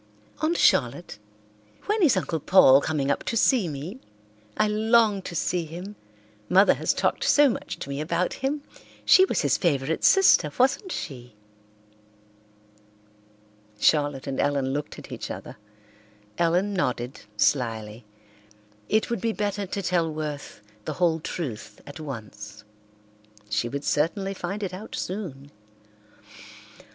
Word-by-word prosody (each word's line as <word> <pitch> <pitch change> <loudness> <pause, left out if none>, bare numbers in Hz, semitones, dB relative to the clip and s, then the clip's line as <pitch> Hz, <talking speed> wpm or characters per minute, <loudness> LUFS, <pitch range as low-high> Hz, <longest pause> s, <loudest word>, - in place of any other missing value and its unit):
"Aunt 325 +2 +1
Charlotte, 125 -1 +2 0.7
when 425 +1 0
is 290 - +4
Uncle 170 -3 -2
Paul 140 -4 +6
coming 145 -3 -1
up - - -2
to 230 - -1
see 230 -4 +3
me? 155 - -6 0.6
I 215 - +3
long 215 -1 +3
to 180 - -8
see 175 +1 0
him; 180 +6 -8 0.5
Mother 195 +3 +6
has - - 0
talked - - 0
so 290 -1 +5
much 230 - -5
to - - -7
me 140 +1 -4
about 170 +3 -1
him. 285 +2 -1 0.4
She 375 - +7
was - - -1
his - - +2
favourite 150 -3 0
sister, 385 - +5
wasn't 275 +10 +1
she?" 125 - -7 2.4
Charlotte 145 -1 +2
and 135 - -4
Ellen 140 -2 0
looked 145 +1 -4
at - - -11
each - - -6
other. - - -8 0.8
Ellen 175 +4 +2
nodded 125 -8 -2 0.2
slyly. 115 -3 0 0.9
It 220 +2 +1
would 235 -5 -2
be 225 -1 0
better 205 -1 -2
to 200 +1 -4
tell 170 -2 +1
Worth 150 -6 -6 0.2
the - - -3
whole 170 -3 +1
truth 145 -8 -6
at 145 - -10
once. 105 -7 -8 0.9
She 110 +3 0
would 140 +3 -5
certainly 195 +8 0
find 195 +3 -5
it 185 -2 -4
out 200 +4 -7
soon. 150 -8 -6
170 Hz, 135 wpm, -25 LUFS, 140-205 Hz, 2.4 s, She